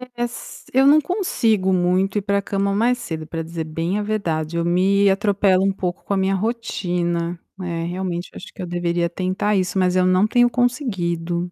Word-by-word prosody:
É 240 - -2
s 240 0 -7
eu 265 +2 +5
não 295 +2 +7
consigo 230 - 0
muito 185 +2 +1
ir 205 - -1
para 200 0 +1
cama 200 0 -1
mais 235 +5 +2
cedo, 160 -7 -6
pra 165 +1 -4
dizer 165 0 -5
bem 165 +5 -2
a - - -1
verdade, 170 -7 -2
eu 170 - 0
me 190 +3 +3
atropelo 195 -1 +3
um 195 - +3
pouco 185 -2 -4
com 200 - -1
a - - 0
minha 190 0 +1
rotina, 175 -5 -2 0.2
né, 175 -3 -4
realmente 175 0 -4
eu - - -10
acho - - -10
que - - -26
eu 185 - -3
deveria 175 0 -1
tentar 185 +4 -1
isso, 185 0 0
mas 180 -1 +2
eu 185 - +4
não 185 +2 +4
tenho 245 +2 +4
conseguido. 180 - -1
185 Hz, 205 wpm, -21 LUFS, 175-205 Hz, 0.2 s, não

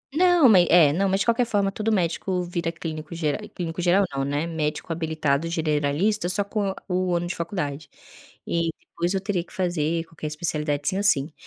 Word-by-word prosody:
Não, 355 -4 +5
ma 200 -6 +7
é, 170 -4 +5
não, 195 +4 +1
mas 195 +1 +1
de - - +1
qualquer 235 +1 +3
forma 200 -3 +1
todo 215 +2 -1
médico 180 -1 0
vira 170 -1 -2
clínico 160 -1 -6
ger 155 -3 -2
clínico 170 0 -5
geral 185 +3 +4
não, 135 0 -1
né, 145 +3 -1
médico 155 -1 -3
habilitado 155 -2 -1
generalista 160 +5 0
só 185 +3 +1
com 200 0 -2
a 190 - -4
o 180 -1 0
ano 170 - -1
de 175 - -4
faculdade. 155 -5 -4 0.6
E 170 -1 0
depois 175 +2 -3
eu - - +1
teria 190 -3 -1
que - - -21
fazer 170 -4 0
qualquer 165 -2 -7
especialidade 150 -2 -2
sim 190 - -2
ou 200 - -1
sim. 150 -6 +2
170 Hz, 200 wpm, -24 LUFS, 155-190 Hz, 0.6 s, ma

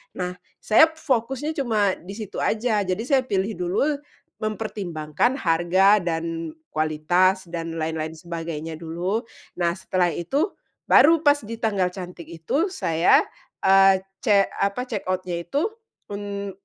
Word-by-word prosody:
Nah 180 0 -4 0.2
saya 270 +9 +6
fokusnya 275 -2 -2
cuma 220 -10 0
di 195 +3 -9
situ 215 -3 -6
aja, 220 0 +1
jadi 185 +4 -1
saya 265 +1 +3
pilih 195 0 0
dulu, 180 +5 0 0.6
mempertimbangkan 210 - -2
harga, 180 +4 +4
dan 165 -1 -3 0.2
kualitas, 175 +5 +1
dan 165 -1 -4
lain-lain 160 0 -2
sebagainya 165 -1 -6
dulu. 175 +7 -2 0.3
Nah 170 -1 +2
setelah 180 0 0
itu 275 - -1 0.3
baru 325 +1 +6
pas 290 0 +5
di 230 0 -6
tanggal 205 -5 +1
cantik 180 -3 -9
itu, 170 - -1
saya, 170 - +3 0.4
eee, 195 0 +6 0.2
ce 205 -5 +4
apa, 200 +6 -1
check 250 -3 -4
out-nya 185 -2 -2
itu, 285 - 0 0.5
un 200 -1 -4
190 Hz, 130 wpm, -24 LUFS, 170-225 Hz, 0.6 s, saya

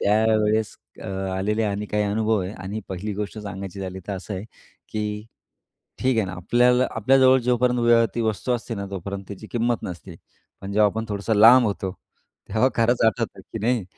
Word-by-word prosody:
त्यावेळेस 110 0 +2 0.2
अ, - - -8 0.3
आलेले 105 +3 0
अ, 105 - 0
आणि 105 +1 -3
काही 105 0 0
अनुभव 110 +1 +1
आहे 95 +3 -5
आणि 100 +2 -6
पहिली 95 +3 -4
गोष्ट 105 +1 -5
सांगायची 100 -1 -7
झाली 95 0 -5
तर - - -1
असं 95 +2 -6
आहे 95 +3 -5 0.4
की 105 0 -3 0.7
ठीक 130 -2 +1
आहे 110 - +2
ना, - - -6
आपल्याला 125 +8 +3
आपल्या 130 +5 +3
जवळ 130 0 +6
जोपर्यंत 120 -1 +3
ती 120 - -1
वस्तू 110 +3 -1
असते 120 -1 -3
ना, 100 -1 -5
तोपर्यंत 100 +1 -5
त्याची 100 +1 -8
किंमत 120 -1 0
नसते. 90 -1 -8 0.4
पण 100 0 -6
जेव्हा 105 +1 +5
आपण 110 +2 -4
थोडंसं 105 +2 -1
लांब 120 +4 +8
होतो, 100 -2 -2 0.6
तेव्हा 110 +6 +3
खरंच 115 +1 +2
आठवतं 110 - -1
की - - -8
नाही 115 -2 +1
105 Hz, 185 wpm, -23 LUFS, 100-115 Hz, 0.7 s, लांब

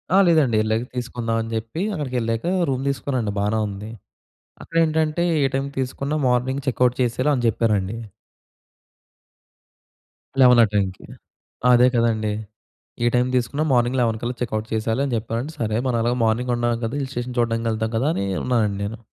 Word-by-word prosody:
ఆ! - - +6
లేదండి. 150 -9 +4
వెళ్ళాక 110 +2 0
తీసుకుందాం 120 -2 -2
అని 115 - -5
జెప్పి, 115 +9 -3
అక్కడికి 140 -6 -4
వెళ్ళాక 115 +4 -2 0.2
రూమ్ 130 0 -1
తీసుకున్నానండి, 130 -6 -2
బానే 105 +2 +1
ఉంది. 100 +2 -7 0.7
అక్కడేంటంటే 160 0 +1 0.2
ఏ - - +3
టైమ్‌కి 140 +1 -2
తీసుకున్న 135 +3 -3
మార్నింగ్ 130 +3 0
చెక్‌ఔట్ 125 -1 +2
చేసేయాలి 130 +4 +1
అని 120 - -2
చెప్పారండి. 105 -2 0 2.5
11 125 -2 +7
ఆ - - +6
టైమ్‌కి. 95 -2 -1 0.7
అదే 125 +1 +6
కదండీ! 110 -3 +1 0.7
ఏ - - +3
టైమ్ 125 +1 +3
తీసుకున్న 125 +5 0
మార్నింగ్ 125 +1 +2
11 115 -2 +1
కల్లా 120 +1 -3
చెక్‌ఔట్ 110 -2 -2
చేసేయాలి 110 +4 0
అని 135 - -3
చెప్పారండి. 115 +7 -3
"సరే. 110 -1 -1
మనం 120 -2 +1
అలాగే 120 +1 +1
మార్నింగ్ 120 +3 +1
ఉన్నాం 120 -1 0
కదా! 115 - -3
హిల్ 135 -1 -4
స్టేషన్ 120 0 -4
చూడడానికి 115 -1 0
వెళ్తాం 110 0 -1
కదా!" 135 +6 +1
అని 100 - -1 0.2
ఉన్నానండి 110 -5 +1
నేను. 110 +2 -5
120 Hz, 155 wpm, -22 LUFS, 110-130 Hz, 2.5 s, 11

